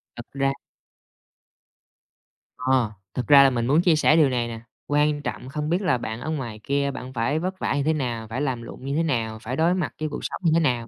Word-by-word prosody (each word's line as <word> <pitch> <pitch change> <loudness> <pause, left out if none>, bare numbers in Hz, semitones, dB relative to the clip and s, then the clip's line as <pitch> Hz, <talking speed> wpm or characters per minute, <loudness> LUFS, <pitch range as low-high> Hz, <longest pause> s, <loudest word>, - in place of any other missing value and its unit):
Thật 120 - -8
ra 135 0 +1 2.1
Ờ. 130 -3 +1 0.2
Thật 125 -3 -3
ra 140 -1 +9
là 135 - +6
mình 120 -2 -1
muốn 150 +5 +4
chia 175 -3 +4
sẻ 155 0 +4
điều 155 -4 +5
này 120 -2 -1
nè. 115 -1 -6 0.3
Quan 145 0 +2
trọng 130 -2 -5
không 150 +1 -3
biết 175 +4 +1
là 170 -10 +2
bạn 110 0 -5
ở - - -4
ngoài 120 -9 -4
kia 140 0 0
bạn 130 -1 -8
phải 130 +6 0
vất 185 +2 -4
vả - - 0
như 145 - 0
thế 160 - +2
nào, 120 -6 -3
phải 115 +5 -4
làm 130 -5 -1
lụng 120 +3 -10
như 140 +1 -2
thế 165 - +2
nào, 115 -8 -1
phải 120 +3 -4
đối 165 +4 +3
mặt 180 -3 -2
với 155 -1 -2
cuộc 145 - -5
sống - - -5
như 165 - +3
thế 165 - +4
nào. 125 -7 0
140 Hz, 245 wpm, -24 LUFS, 120-155 Hz, 2.1 s, ra